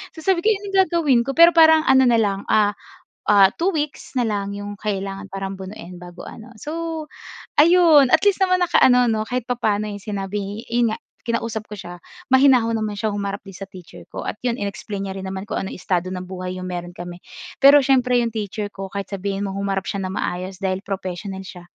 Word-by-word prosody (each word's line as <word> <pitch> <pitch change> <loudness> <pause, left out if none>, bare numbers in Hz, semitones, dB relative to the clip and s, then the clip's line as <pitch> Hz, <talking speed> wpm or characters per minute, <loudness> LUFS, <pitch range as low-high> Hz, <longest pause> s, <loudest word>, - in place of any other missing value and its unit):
So - - -9
sabi 375 -1 +2
ko, - - +1
"Ano 405 -1 -3 0.2
gagawin 315 -9 +2
ko" 275 - -3
pero 335 +1 +8
parang 320 -1 +6
ano 265 0 +6
na 235 -1 +4
lang, 200 -2 0
ah, 210 -1 +3 0.6
ah, 200 -2 +6
2 355 +4 0
weeks 300 -6 -4
na 245 - +1
lang 200 -2 -2
'yung 205 0 -6
kailangan 195 -1 -4
parang 195 0 -5
bunuin 190 -2 -9
bago 175 0 -11
ano. 235 +2 -11
So 325 0 -4 0.5
ayun, 320 -4 +6
at 320 - +6
least 405 -2 +4
naman, 365 -1 +3
nakaano 250 -8 +4
'no, 215 -1 -1
kahit 245 0 -3
papaano 215 -4 0
'yong 205 -1 -7
sinabi 205 +1 -4
'yun 235 -1 +1
nga, - - -5 0.3
kinausap 230 -2 -2
ko 210 - -10
siya. 175 -2 -8 0.4
Mahinahon 255 -4 +4
naman 215 -1 -3
siya, 220 +1 0
humarap 200 -1 -4
din 195 -2 -13
sa 195 - -7
teacher 185 -3 -13
ko, - - -5
at - - -4
'yon, 240 -1 0
in-explain 200 0 -4
niya 190 - -6
rin 190 - -6
naman 190 +2 -6
kung - - -2
anong 195 - -6
estado 185 0 -2
ng 180 - -5
buhay 185 0 -6
'yong 185 - -5
meron 175 0 -6
kami. 175 0 -8 0.4
Pero 285 +1 +7
siyempre, 250 -2 +3
'yong 235 - 0
teacher 210 -1 -4
ko, 195 -1 -7
kahit 200 -1 -4
sabihin 200 0 -3
mong 195 - -5
humarap 195 -1 -2
siya 200 -1 -3
ng 185 - -4
maayos 185 0 -4
dahil 190 -1 -1
professional 190 0 -5
siya. 180 -2 -11
205 Hz, 210 wpm, -21 LUFS, 195-250 Hz, 0.6 s, pero